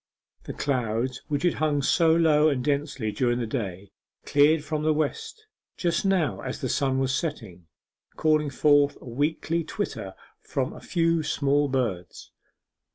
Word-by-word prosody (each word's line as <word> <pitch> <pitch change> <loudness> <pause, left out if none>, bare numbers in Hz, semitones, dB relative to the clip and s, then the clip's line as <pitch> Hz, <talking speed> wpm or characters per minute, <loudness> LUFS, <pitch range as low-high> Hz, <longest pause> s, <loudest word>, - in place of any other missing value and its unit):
The - - -6
clouds 125 -1 -2
which 145 0 -2
had 175 - +3
hung 150 -2 0
so 165 +3 +3
low 155 -2 +4
and 130 -4 -1
densely 140 -6 -1
during 120 +1 0
the 120 - -2
day 100 -5 -5 0.3
cleared 150 +2 +4
from 155 0 -3
the 155 0 +2
west 155 - -3 0.3
just 170 +1 0
now 190 -6 +1
as 130 - -5
the 130 - -3
sun 135 0 +1
was 135 0 0
setting, 110 - -4 0.5
calling 155 -1 +2
forth 145 +1 +3
a - - -14
weakly 155 +6 -1
twitter - - -5 0.3
from - - -3
a - - -11
few 165 -1 +1
small 145 -1 +1
birds. 110 -10 -3
145 Hz, 155 wpm, -26 LUFS, 125-155 Hz, 0.5 s, low